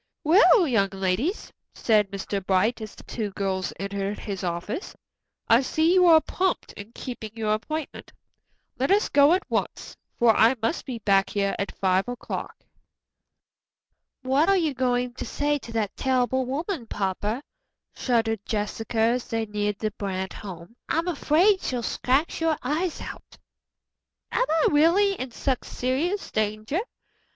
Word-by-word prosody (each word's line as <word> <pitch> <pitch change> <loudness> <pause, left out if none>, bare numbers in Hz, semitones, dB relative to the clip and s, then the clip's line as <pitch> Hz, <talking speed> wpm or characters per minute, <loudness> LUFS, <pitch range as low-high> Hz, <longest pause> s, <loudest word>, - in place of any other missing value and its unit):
"Well, 360 +3 +6
young 210 -7 +2
ladies," 195 - -2 0.2
said 210 -3 +2
Mr. 195 0 -4
Bright, 195 +6 +1
as 215 -2 -8
the - - -13
two 215 -3 -4
girls 190 -2 -2
entered 200 +1 -3
his 195 -3 -5
office, 180 - -4 0.5
"I 230 +2 +6
see 315 +5 +2
you 365 -1 +5
are 325 -2 +8
prompt 370 +3 -2
in 205 +2 -10
keeping 240 -4 -6
your 215 -2 0
appointment. 305 +8 -5 0.7
Let 270 - +1
us 405 +2 +3
go 285 +3 +5
at 370 - +1
once, - - -3 0.2
for 230 -2 +4
I 230 +4 +5
must 230 +10 -2
be 250 -3 -4
back 195 -3 +2
here 200 -1 0
at 200 - -4
five 190 +2 +1
o'clock." 245 -1 -5 1.7
"What 275 +7 +2
are 390 - +5
you 320 -5 +1
going 250 -1 0
to - - -6
say 290 0 -1
to 235 - -10
that 215 -3 -1
terrible 260 0 +1
woman, 295 - -3
papa?" 205 +6 -2 0.5
shuddered 225 -4 0
Jessica 220 +2 -3
as 235 +2 +2
they 225 -1 -1
neared 210 -1 -2
the 215 0 -2
Brant 190 -2 -4
home. 185 0 -9
"I'm 330 +2 0
afraid 355 +4 +3
she'll 245 -2 -2
scratch 275 +9 0
your 325 -2 +2
eyes 315 +7 -1
out." - - -10 0.9
"Am - - +2
I 320 0 +3
really 340 +7 +4
in 260 -8 -5
such 255 +2 -2
serious 305 +11 -2
danger?" 215 - -1
240 Hz, 150 wpm, -25 LUFS, 205-305 Hz, 1.7 s, are